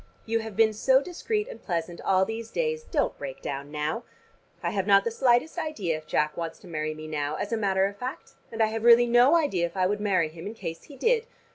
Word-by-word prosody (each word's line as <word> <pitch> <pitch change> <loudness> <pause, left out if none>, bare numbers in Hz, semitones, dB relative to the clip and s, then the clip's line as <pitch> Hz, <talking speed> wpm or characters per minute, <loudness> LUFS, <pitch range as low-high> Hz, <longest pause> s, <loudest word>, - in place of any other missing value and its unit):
You 230 0 0
have 220 -2 -7
been 220 0 +4
so 260 +5 +4
discreet 415 +7 -3
and 230 - -10
pleasant 170 -1 -3
all 190 0 +3
these 225 +2 -5
days: 470 -1 -2
don't 290 -5 0
break 135 -1 -6
down 140 0 -5
now. 150 +8 -2 0.6
I - - 0
have 195 -1 -1
not 200 -1 +6
the 230 - -1
slightest 250 +7 +2
idea 215 - -2
if 155 0 -9
Jack 150 0 0
wants 165 -1 -4
to 190 - -13
marry 155 -2 -3
me 155 0 -8
now, 150 -1 -2
as 205 - -4
a - - +2
matter 195 -2 +2
of 200 +1 -4
fact; 255 +3 -6 0.2
and 225 -1 +1
I 220 0 0
have 225 0 -3
really 235 0 +7
no 240 +6 +5
idea 195 - +2
if 170 - -12
I 185 - +3
would 205 +2 0
marry 185 -6 +2
him 165 +4 -9
in 215 - -6
case 165 -6 -6
he 285 - -12
did. 465 - +2
205 Hz, 245 wpm, -27 LUFS, 170-240 Hz, 0.6 s, really